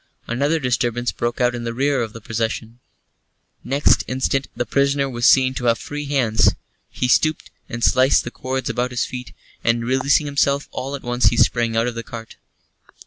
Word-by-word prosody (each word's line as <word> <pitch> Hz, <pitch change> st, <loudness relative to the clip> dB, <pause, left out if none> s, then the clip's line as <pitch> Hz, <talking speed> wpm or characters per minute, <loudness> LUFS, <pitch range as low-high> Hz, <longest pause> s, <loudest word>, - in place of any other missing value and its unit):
Another 140 Hz, +7 st, 0 dB
disturbance 120 Hz, -2 st, 0 dB
broke 120 Hz, 0 st, -3 dB
out 125 Hz, 0 st, +2 dB
in 120 Hz, -1 st, -5 dB
the 115 Hz, 0 st, -4 dB
rear 140 Hz, +1 st, +1 dB
of 115 Hz, -2 st, -3 dB
the 115 Hz, -, -11 dB
procession. 115 Hz, +1 st, -3 dB, 0.8 s
Next 140 Hz, +3 st, +2 dB
instant 130 Hz, +1 st, -1 dB
the 120 Hz, -, -2 dB
prisoner 140 Hz, +1 st, +1 dB
was 120 Hz, -2 st, +1 dB
seen 130 Hz, -1 st, +4 dB
to 125 Hz, -, -4 dB
have 115 Hz, -1 st, +3 dB
free 145 Hz, 0 st, -6 dB
hands. 125 Hz, -6 st, +2 dB, 0.3 s
He 125 Hz, -, -2 dB
stooped 155 Hz, +4 st, +1 dB, 0.2 s
and 120 Hz, 0 st, -5 dB
sliced 130 Hz, +1 st, +4 dB
the 120 Hz, -, -6 dB
cords 130 Hz, +1 st, -4 dB
about 125 Hz, +1 st, -1 dB
his 125 Hz, -1 st, -1 dB
feet, 125 Hz, -1 st, -7 dB, 0.3 s
and, 115 Hz, 0 st, +1 dB
releasing 135 Hz, +4 st, +2 dB
himself, 140 Hz, 0 st, +1 dB
all 135 Hz, +2 st, -4 dB
at 140 Hz, -, -9 dB
once 120 Hz, 0 st, 0 dB
he -, -, +4 dB
sprang 115 Hz, -2 st, +2 dB
out 115 Hz, -, +2 dB
of 120 Hz, -, -2 dB
the 115 Hz, -, -5 dB
cart. 115 Hz, -1 st, -10 dB
125 Hz, 190 wpm, -21 LUFS, 120-135 Hz, 0.8 s, seen